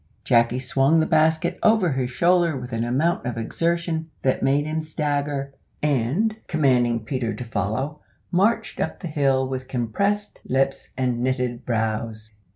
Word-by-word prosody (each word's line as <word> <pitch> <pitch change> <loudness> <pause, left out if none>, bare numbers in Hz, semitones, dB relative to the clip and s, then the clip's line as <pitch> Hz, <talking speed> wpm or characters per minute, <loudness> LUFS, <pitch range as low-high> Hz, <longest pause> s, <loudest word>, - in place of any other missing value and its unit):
Jacky 120 -1 +3
swung 135 +4 +2
the 160 - +3
basket 160 +3 +2
over 215 -6 +4
his 130 -2 -1
shoulder 170 +2 +2
with 125 -1 -7
an 115 0 0
amount 140 +9 +1
of 120 -1 -3
exertion 165 +6 -1
that 130 - +1
made 140 +2 +2
him 155 +1 -2
stagger, 145 -3 -2 0.3
and, 150 - +1
commanding 125 -7 +2
Peter 120 -1 -2
to 125 - -5
follow, 115 +8 -2 0.3
marched 215 +4 +1
up - - -2
the 180 - -4
hill 135 -3 +1
with 130 -1 -4
compressed 200 - -1
lips 135 +1 0
and 125 -2 0
knitted 125 -1 -1
brows. 110 -1 -2
135 Hz, 150 wpm, -23 LUFS, 125-160 Hz, 0.3 s, over